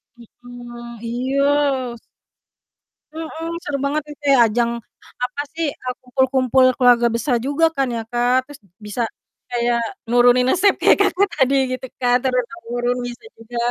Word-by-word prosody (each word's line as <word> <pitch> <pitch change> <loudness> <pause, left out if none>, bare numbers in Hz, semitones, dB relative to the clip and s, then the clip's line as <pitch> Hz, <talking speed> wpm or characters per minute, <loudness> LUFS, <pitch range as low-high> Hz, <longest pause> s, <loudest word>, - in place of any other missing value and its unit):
Mhm. 240 0 -11
Iya 255 +3 -2 0.6
s - - -44 1.2
Mhm. 325 0 -6 0.2
Seru 285 -1 -2
banget 300 +2 0
gitu 295 0 -14
ya. 270 - +6
Ajang 235 +1 +1 0.5
apa 250 +3 -2
sih, 325 -2 -1
eee, 255 0 -6
kumpul-kumpul 260 0 +2
keluarga 245 -2 +5
besar 240 +2 0
juga 285 +6 +1
kan 270 -1 +1
ya, 225 - -2
Kak. 245 +2 +2
Terus 290 -1 -12 0.3
bisa 210 +4 -4 0.5
kayak 240 -1 0 0.3
nurunin 245 +1 +5
resep 395 +2 +4
kayak - - +4
Kakak 400 0 +3
tadi 270 +1 +3 0.2
gitu 255 0 -4
kan 245 0 +3
turun 250 -1 0
temurun, 245 -6 -3
bisa 240 - -9
juga 230 +1 -9
250 Hz, 145 wpm, -20 LUFS, 240-275 Hz, 1.2 s, ya